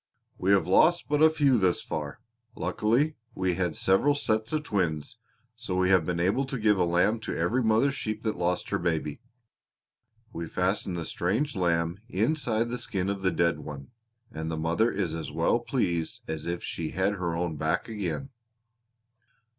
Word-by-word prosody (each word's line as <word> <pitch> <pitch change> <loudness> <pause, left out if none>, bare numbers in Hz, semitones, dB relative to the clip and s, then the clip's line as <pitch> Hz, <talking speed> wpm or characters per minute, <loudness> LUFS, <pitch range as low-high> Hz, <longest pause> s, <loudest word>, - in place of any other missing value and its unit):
We 95 - 0
have 100 - +3
lost 170 - +4
but 150 0 +2
a 160 - +8
few 145 -6 +3
thus 90 -3 +1
far. 75 -2 -5 0.3
Luckily 130 +9 +1 0.2
we 95 -1 0
had 90 -3 -1
several 95 +10 +3
sets 110 -5 0
of 155 -1 0
twins, 85 - -2 0.4
so 90 - -4
we 95 0 +2
have 90 -4 +4
been 90 -1 -1
able 100 +10 +2
to 135 0 -4
give 105 -3 +3
a 90 - +4
lamb 90 +6 +2
to - - -4
every 100 +10 +1
mother 115 +4 +3
sheep 110 -5 -4
that 110 -2 -1
lost 90 +1 -1
her - - +1
baby. 80 -4 -2 1.1
We 85 0 -4
fasten 90 +1 -1
the 85 -2 -3
strange 115 +11 -1
lamb 85 -1 0
inside 115 0 0
the 125 +1 -3
skin 95 +1 -2
of 100 -1 -4
the 95 - +2
dead 85 0 +1
one, 70 +1 -8 0.4
and 80 +1 -4
the 80 - -3
mother 85 +9 +1
is 95 -5 -2
as 80 -1 -5
well 85 +8 +2
pleased 90 -10 -1
as 80 0 -4
if 85 0 -3
she 80 -2 -3
had 95 +4 0
her 85 -4 -2
own 85 -1 -2
back 80 +3 0
again." 110 +4 -4
95 Hz, 180 wpm, -28 LUFS, 85-115 Hz, 1.1 s, a